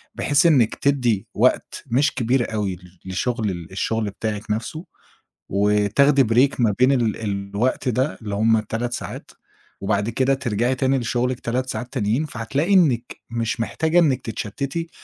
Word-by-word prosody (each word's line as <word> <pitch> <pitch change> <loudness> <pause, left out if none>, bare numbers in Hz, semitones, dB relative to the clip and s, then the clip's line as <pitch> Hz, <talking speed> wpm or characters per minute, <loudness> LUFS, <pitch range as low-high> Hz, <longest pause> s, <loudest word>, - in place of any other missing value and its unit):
بحيث 145 +3 +2
إنِّك 135 -10 +4
تدِّي 125 -8 +1
وقت - - +1
مش 135 +4 +2
كبير 120 -1 0
أوي 100 -4 -2 0.3
لشُغل 110 +4 -1
ال 85 -2 -8
الشُغل 110 +3 -1
بتاعِك 105 +1 -4
نَفسه 120 - -3 0.6
وتاخدي 105 +8 +3
break 125 +5 +2
ما 115 -4 +3
بين 130 +2 +5
ال 120 -5 +1
الوقت 100 +5 -1
ده 130 +5 0
اللي 105 -2 -4
هم 110 +2 +3
3 115 +3 -3
ساعات - - -7 0.5
وبعد 100 +2 0
كده 130 +4 +1
ترجعي 120 -1 0
تاني 135 +1 +1
لشُغلِك 125 +1 -1
3 125 +2 -2
ساعات 125 -1 -5
تانيين، 110 +9 0
فهتلاقي 140 - -1
إنِّك 135 -11 +2
مش 115 0 -2
محتاجة 160 - +1
إنِّك 140 -7 +2
تتشتِّتي 140 +10 -4
120 Hz, 150 wpm, -22 LUFS, 105-135 Hz, 0.6 s, بين